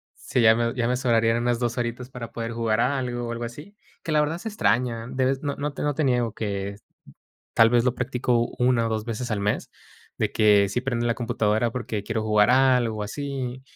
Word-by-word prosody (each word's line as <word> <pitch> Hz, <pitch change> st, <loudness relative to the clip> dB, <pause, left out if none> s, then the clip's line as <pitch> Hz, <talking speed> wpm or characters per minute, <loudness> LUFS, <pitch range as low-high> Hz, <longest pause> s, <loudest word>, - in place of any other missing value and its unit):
sí, 125 Hz, -, -1 dB
ya 110 Hz, 0 st, +6 dB
me 115 Hz, 0 st, 0 dB
ya 120 Hz, -2 st, 0 dB
me 125 Hz, 0 st, +1 dB
sobrarían 115 Hz, -2 st, +2 dB
unas 120 Hz, 0 st, 0 dB
2 120 Hz, -1 st, -1 dB
horitas 120 Hz, +1 st, -3 dB
para 120 Hz, -3 st, -8 dB
poder 115 Hz, 0 st, -4 dB
jugar 115 Hz, -2 st, 0 dB
a 140 Hz, +2 st, +1 dB
algo 120 Hz, -2 st, -3 dB
o -, -, -4 dB
algo 115 Hz, 0 st, -4 dB
así, 150 Hz, -, -8 dB, 0.3 s
que 165 Hz, -, -3 dB
la 150 Hz, -, +3 dB
verdad 155 Hz, +3 st, -1 dB
se 225 Hz, -, -5 dB
extraña 115 Hz, -, 0 dB
de 130 Hz, +1 st, -1 dB
vez 135 Hz, +1 st, 0 dB
no 140 Hz, -1 st, -2 dB
no 145 Hz, 0 st, -3 dB
te -, -, -5 dB
no 145 Hz, 0 st, +1 dB
te 155 Hz, -, -1 dB
niego 125 Hz, -4 st, +1 dB
que, 100 Hz, -2 st, -3 dB, 0.8 s
tal 115 Hz, 0 st, +6 dB
vez, 120 Hz, 0 st, +3 dB
lo 125 Hz, -, +1 dB
practico 125 Hz, -2 st, 0 dB
1 125 Hz, -2 st, +2 dB
o -, -, -1 dB
2 110 Hz, -1 st, -2 dB
veces 120 Hz, +1 st, -4 dB
al 105 Hz, -2 st, -1 dB
mes, 105 Hz, +1 st, -1 dB, 0.5 s
de -, -, 0 dB
que 105 Hz, -2 st, +4 dB
sí 125 Hz, +5 st, -2 dB
prendo 120 Hz, -3 st, -1 dB
la 115 Hz, -, +1 dB
computadora 115 Hz, -1 st, 0 dB
porque 115 Hz, -4 st, -4 dB
quiero 115 Hz, 0 st, -2 dB
jugar 105 Hz, +1 st, +3 dB
a 130 Hz, 0 st, +5 dB
algo 115 Hz, -3 st, -1 dB
o 105 Hz, -, -2 dB
así. 130 Hz, +2 st, -5 dB
120 Hz, 235 wpm, -25 LUFS, 115-130 Hz, 0.8 s, ya